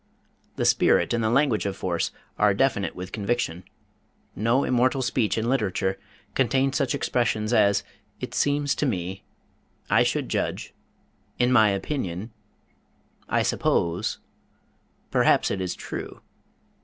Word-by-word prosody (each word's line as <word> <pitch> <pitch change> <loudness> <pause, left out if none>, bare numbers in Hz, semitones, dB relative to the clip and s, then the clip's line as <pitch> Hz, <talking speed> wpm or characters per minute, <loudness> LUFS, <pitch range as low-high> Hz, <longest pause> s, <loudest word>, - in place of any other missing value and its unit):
The - - -1
spirit - - +3
and 120 -1 0
the 110 - +2
language 120 -4 +2
of 95 -1 -4
force 85 -2 -1 0.3
are 105 -2 +4
definite 100 -5 +1
with 90 +1 -7
conviction. 100 -5 -2 0.7
No 115 +6 +2
immortal 130 +2 +2
speech 120 -3 0
in 110 +1 -1
literature 100 -6 0 0.3
contains 135 +1 +1
such 140 -3 +1
expressions 115 -2 0
as 100 -3 +4 0.4
"it - - -6
seems 145 0 +1
to 150 - +1
me," 95 -4 -3 0.7
"I - - +5
should - - 0
judge," - - -3 0.6
"in 125 +1 +2
my 110 -4 +6
opinion," 100 - -3 1.0
"I - - +2
suppose," 85 +1 0 0.9
"perhaps - - +3
it 95 - -2
is 90 -1 -2
true." - - -7
110 Hz, 130 wpm, -25 LUFS, 95-130 Hz, 1.0 s, my